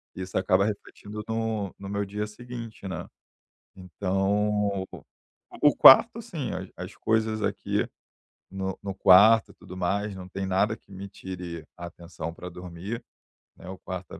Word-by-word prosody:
isso 95 0 -4
acaba 95 0 +3
refletindo 105 0 -6
no 110 -4 -2
no 100 - -8
meu 100 0 -1
dia 105 +2 -3
seguinte, 115 -2 -8
né. 95 -4 -5 0.7
Então, 100 +2 0 0.8
o 145 - +6
quarto, 230 - +9
sim, 165 - -5
as, 95 +1 -5
as 90 +2 -8
coisas 110 -1 0
aqui - - -1 0.7
no 95 -1 -3
no 100 -1 -3
quarto 105 +5 +7
e - - -22
tudo 90 - -11
mais, 100 +3 -1
não 90 -1 -8
tem 95 +1 -4
nada 95 +4 +1
que - - -25
me 95 +1 -7
tire 90 -4 -7
a 85 - -7
atenção 85 -1 -7
para 90 +1 -8
dormir, 90 +5 -7 0.6
né, - - -11
o 95 - -7
quarto 95 -1 -7
é - - -11
100 Hz, 155 wpm, -27 LUFS, 95-105 Hz, 0.8 s, quarto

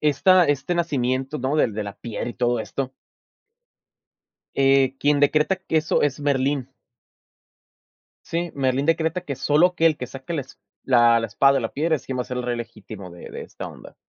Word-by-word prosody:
esta 165 +5 +4
este 145 +3 0
nacimiento, 135 -4 -1
¿no?, 135 +2 -1
Del 115 -8 +2
de 110 - -2
la 100 -1 -7
piel 120 0 -5
y 120 - -6
todo 120 -1 0
esto 130 +3 -4 1.6
eh, 135 -1 +4
quien 145 0 +3
decreta 150 +6 +3
que 185 -3 -3
eso, 155 0 +2
es 145 0 0
Merlín. 140 -2 0 1.6
Sí, 170 +1 -2
Merlín 135 +1 0
decreta 165 +1 +1
que 145 -7 -6
solo 150 +5 +4
aquel 165 -3 +2
que 125 - -4
saque 135 +6 -8
la 160 - -1
esp 130 - -13 0.3
la 120 -2 +5
la 115 - -2
espada 135 +7 +3
de 135 - +2
la 115 - -4
piedra, 160 +3 +1
es - - -12
quien 130 - -3
va 125 - +1
a - - -11
ser 125 - -5
el - - -2
rey 120 -1 -2
legítimo 105 -5 -9
de 85 - -11
de - - -7
esta - - -8
onda. - - -13
135 Hz, 195 wpm, -23 LUFS, 125-150 Hz, 1.6 s, la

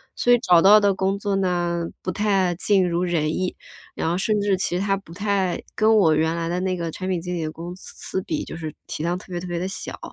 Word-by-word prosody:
所 245 - +2
以 245 - +7
找 180 -7 +5
到 205 +3 +8
的 200 -1 +3
工 190 +1 -1
作 200 -1 -1
呢， 175 -3 0 0.2
不 185 - -2
太 195 -4 +1
尽 190 0 +2
如 175 +1 0
人 160 -3 0
意， 185 -1 -2 0.4
然 160 - -2
后 175 - 0
甚 210 +1 +1
至 200 -1 +2
其 180 -1 -1
它 195 0 +1
不 180 -4 -13
太 200 -2 0
跟 220 0 +4
我 160 -7 +5
原 160 +1 +1
来 165 0 -2
的 175 +2 -1
那 185 -1 -1
个 170 -1 -3
产 185 +3 -5
品 180 - 0
经 180 0 -4
理 165 - -2
的 155 - -3
公 170 +3 -7
司 190 0 -6
比， 305 - -3
就 - - -8
是 160 -2 -6
体 155 - -4
量 175 +1 0
特 - - -12
别 175 - -2
特 180 - -6
别 175 -1 -3
地 185 - -2
小。 195 - -6
180 Hz, 280 characters per minute, -23 LUFS, 170-195 Hz, 0.4 s, 到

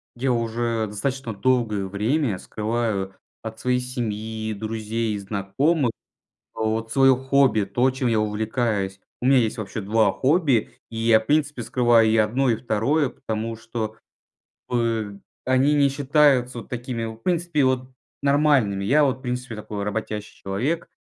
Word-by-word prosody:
Я 130 +2 0
уже 115 -1 -1
достаточно 120 +3 -3
долгое 110 -3 +1
время 110 +4 0
скрываю 105 -3 -2 0.3
от 110 0 -7
своей 125 0 +1
семьи, 110 -3 -4
друзей 110 +1 -3
и - - -3
знакомых 105 - 0 0.6
вот 110 +1 -2
свое 135 -1 +6
хобби- 130 -3 +3
то, 120 +7 +1
чем 130 -1 -1
я 110 -2 +2
увлекаюсь. 105 -2 -1 0.2
У - - +1
мя 135 0 +6
есть, 115 -2 0
вообще, 110 -1 -5
2 110 +2 +2
хобби, 135 - +2 0.2
и 115 - -8
я, 115 -1 +4
в 110 - -13
принципе, 145 -3 +1
скрываю 115 -1 +3
и 110 - +3
1, 120 +5 +2
и 115 - +2
2 130 +7 +1
потому 115 -1 -4
что 110 -1 -5 0.7
бы 115 -4 -1 0.2
они 130 +3 +3
не 140 -1 +4
считаются 135 -3 +2
вот 115 - -9
такими, 120 -1 -4
в 110 0 -6
принципе, 165 +3 0
вот 130 0 +1 0.3
нормальными. 140 -9 +3
Я 145 +9 +4
вот, 135 -1 0
в 130 - -20
принципе, 125 -2 -4
такой 105 -1 -5
работящий 105 0 -4
человек, 130 +13 -2
115 Hz, 150 wpm, -23 LUFS, 110-130 Hz, 0.7 s, свое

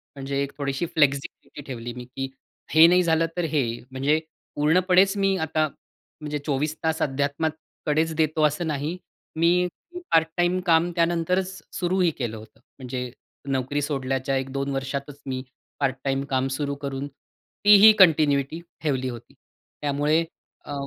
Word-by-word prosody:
म्हणजे 140 0 -3
एक 140 - -5
थोडीशी 140 +2 -2
फ्लेक्सिबिलीटी 140 -2 -1
ठेवली 120 -2 -6
मी, 125 +1 -8
की 135 +2 -5 0.4
हे 160 +1 +9
नाही 180 +1 +4
झालं 165 -1 +2
तर 175 - 0
हे 150 -2 +2 0.3
म्हणजे 140 +4 +1 0.4
पूर्णपणेच 185 +6 +4
मी 195 -1 +2
आता 155 0 +1 0.5
म्हणजे 150 -1 -3
24 150 +1 -1
तास 160 0 0
अध्यात्माकडेच 155 +2 -1
देतो 155 0 +1
असं 150 +3 -3
नाही. 150 +3 -2 0.4
मी 175 +2 +3 0.4
पार्ट 160 -1 +4
टाईम 175 +1 +2
काम 170 0 +3
त्यानंतरच 175 +3 0
सुरूही 180 -1 +1
केलं 115 -4 -3
होतं. 110 +1 -14 0.2
म्हणजे 125 -1 -5 0.4
नोकरी 135 +2 -1
सोडल्याच्या 135 -2 -1
1-2 135 +1 -3
वर्षातच 140 +1 -4
मी 130 -1 -3 0.4
पार्ट 135 -2 +1
टाईम 135 0 0
काम 130 0 +1
सुरू 140 0 -2
करून, 140 0 -3 0.6
तीही 210 +1 +9
कंटिन्यूटी 155 -4 +4 0.2
ठेवली 130 -4 0
होती. 120 -2 -10 0.5
त्यामुळे 145 +3 +1 0.4
अ, 145 - -6
145 Hz, 140 wpm, -24 LUFS, 135-165 Hz, 0.6 s, हे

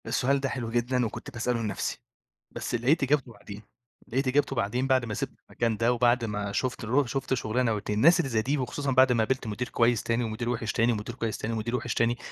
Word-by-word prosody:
السؤال 125 +4 +1
ده 135 0 -1
حلو 120 -4 -4
جدًا، 120 +1 +1
وكنت 115 +5 -6
باسأله 120 -1 -1
لنفسي، 105 -4 -3 0.5
بس - - -3
لقيت 135 +7 +2
إجابته 135 -2 +1
بعدين، 100 -1 -10 0.5
لقيت 130 +3 -1
إجابته 135 +1 +1
بعدين 120 +3 0
بعد 130 -2 +3
ما 110 - -4
سِبت - - -3 0.2
المكان 115 -2 -1
ده 115 +2 +2
وبعد 120 0 +3
ما 105 -2 -3
شُفت 125 +4 -2
الرو 130 +6 +2
شُفت 135 +2 -2
شُغلانة 120 -1 0
و2 105 0 -3
الناس 165 +8 +6
اللي 140 - 0
زي 110 -3 +1
دي 140 +6 0
وخصوصًا 135 +2 -2
بعد 130 0 +5
ما 115 -2 +3
قابلت 130 +1 -1
مدير 110 +4 -3
كويس 115 -1 +2
تاني 115 +1 0
ومدير 115 +1 -3
وحش 115 -2 -1
تاني، 115 -1 +3
ومدير 110 +2 -5
كويس 115 -3 -3
تاني 115 - -3
ومدير 115 +2 -2
وحش 120 -1 -2
تاني، 120 +1 +1
120 Hz, 225 wpm, -27 LUFS, 115-130 Hz, 0.5 s, الناس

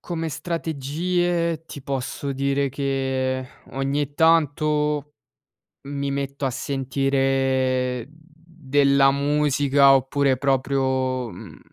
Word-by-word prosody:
come 165 -2 -4
strategie 165 +2 -1
ti 145 - -9
posso 135 +1 -3
dire 140 +1 0
che 130 -1 -2 0.2
ogni 140 +1 -2
tanto 150 -2 +2 0.7
mi 140 0 -3
metto 140 0 -3
a 135 - +1
sentire 135 -2 0
della 150 -3 +1
musica 140 -1 +3
oppure 135 0 +2
proprio, 130 -2 0
mhmm, - - -11
140 Hz, 85 wpm, -23 LUFS, 135-150 Hz, 0.7 s, musica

